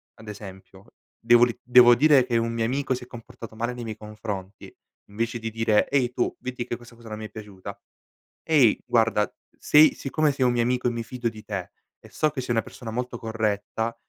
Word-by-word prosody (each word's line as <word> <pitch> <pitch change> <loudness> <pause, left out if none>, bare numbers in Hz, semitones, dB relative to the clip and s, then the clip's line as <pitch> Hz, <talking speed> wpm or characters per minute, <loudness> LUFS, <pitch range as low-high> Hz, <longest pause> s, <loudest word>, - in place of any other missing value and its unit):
ad 110 -1 -12
esempio 95 0 -12 0.3
devo 120 +1 +5
ri 120 - -5
devo 125 0 +7
dire 140 0 +5
che 120 -2 0
un 115 0 -1
mio 115 -1 -1
amico 135 +2 -1
si 125 - -8
è - - -13
comportato 115 -2 -11
male 120 +2 -2
nei 120 -1 -7
miei 110 -2 -6
confronti 105 -3 -7 0.4
invece 115 +3 -3
di 115 0 -5
dire: 110 -1 +2
"Ehi, 125 -3 +1
tu 125 - -1
veti 125 -1 -5
che 120 - -4
questa 120 0 -16
cosa 115 -1 -13
non 110 - -5
mi 110 - -6
è - - -8
piaciuta. 105 -3 -10 0.7
Ehi 145 -9 +4
guarda 110 -3 +2 0.3
sei 150 +1 +6
siccome 150 +2 0
sei 130 -2 +1
un 125 - +3
mio 120 -1 +1
amico 125 +1 0
e - - +1
mi 115 0 -3
fido 125 -1 -3
di 110 -1 -10
te 100 -4 -5 0.3
e - - -16
so 155 - 0
che 145 - -5
sei 125 -2 -2
una 115 - +2
persona 115 -3 -9
molto 125 +1 -4
corretta, 110 0 -2
115 Hz, 215 wpm, -25 LUFS, 110-125 Hz, 0.7 s, devo